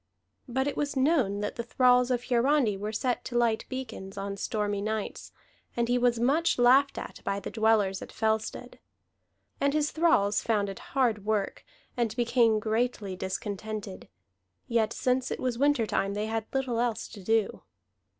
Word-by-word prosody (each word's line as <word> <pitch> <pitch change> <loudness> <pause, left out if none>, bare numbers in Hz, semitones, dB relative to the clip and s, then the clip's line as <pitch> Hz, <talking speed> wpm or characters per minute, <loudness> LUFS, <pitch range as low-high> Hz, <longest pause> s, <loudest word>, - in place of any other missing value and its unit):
But 265 +2 0
it 285 - -2
was 285 -1 -2
known 260 -8 +2
that 210 - -4
the - - -1
thralls 250 +1 +3
of 245 -1 0
Hiarandi 250 -2 +2
were 205 +2 -4
set 245 +3 -1
to 240 - -2
light 230 -2 +1
beacons 225 -7 -6
on 200 0 -4
stormy 205 0 -2
nights, 215 0 -4 0.5
and 235 0 +1
he 245 +1 +2
was 240 -1 +2
much 290 +8 +2
laughed 260 +3 +5
at - - -7
by 200 0 -1
the 195 - -7
dwellers 215 -4 +2
at - - -9
Fellstead. 220 0 -2 0.8
And 280 +1 +1
his 300 -1 +1
thralls 315 -12 +3
found 210 -3 0
it 195 - -7 0.2
hard 230 -6 +2
work, 210 -2 -1 0.3
and 230 -3 -1
became 235 -2 +3
greatly 220 -2 -1
discontented; 200 +1 -5 0.6
yet 225 -2 +1
since 255 +1 0
it - - -4
was 250 -2 -2
winter 285 -4 +3
time, 200 -1 -1
they 210 +1 -1
had 220 0 -3
little 260 -3 -1
else 235 -2 -1
to 205 -4 -11
do. 220 +1 +1
230 Hz, 170 wpm, -28 LUFS, 210-250 Hz, 0.8 s, laughed